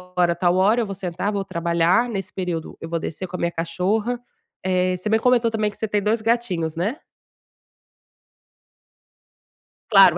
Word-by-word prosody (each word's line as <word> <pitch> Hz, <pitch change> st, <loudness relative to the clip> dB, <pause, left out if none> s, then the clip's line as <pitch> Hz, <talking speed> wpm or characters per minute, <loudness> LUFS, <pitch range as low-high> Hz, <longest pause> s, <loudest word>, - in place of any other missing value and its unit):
hora 175 Hz, -1 st, +3 dB
a -, -, -12 dB
tal 175 Hz, +1 st, +2 dB
hora 205 Hz, +5 st, +4 dB
eu -, -, 0 dB
vou 195 Hz, -, -5 dB
sentar, 185 Hz, +1 st, -2 dB
vou 200 Hz, -1 st, -1 dB
trabalhar, 170 Hz, +4 st, +2 dB
nesse 195 Hz, -3 st, -4 dB
período 175 Hz, -4 st, -4 dB
eu 165 Hz, -, -5 dB
vou 165 Hz, 0 st, -1 dB
descer 175 Hz, +4 st, -5 dB
com 180 Hz, -, -7 dB
a -, -, -9 dB
minha 170 Hz, -, 0 dB
cachorra", 190 Hz, +9 st, -1 dB, 0.4 s
eh, 185 Hz, 0 st, +1 dB
você 185 Hz, +4 st, -4 dB
me 220 Hz, +1 st, +4 dB
comentou 240 Hz, -1 st, +3 dB
também 215 Hz, -1 st, 0 dB
que -, -, -18 dB
você 220 Hz, -, -2 dB
tem 205 Hz, 0 st, 0 dB
2 215 Hz, +2 st, +1 dB
gatinhos, 210 Hz, -9 st, 0 dB
né. 200 Hz, -, -1 dB, 2.9 s
Claro. 195 Hz, -5 st, +7 dB
190 Hz, 175 wpm, -23 LUFS, 175-220 Hz, 2.9 s, Claro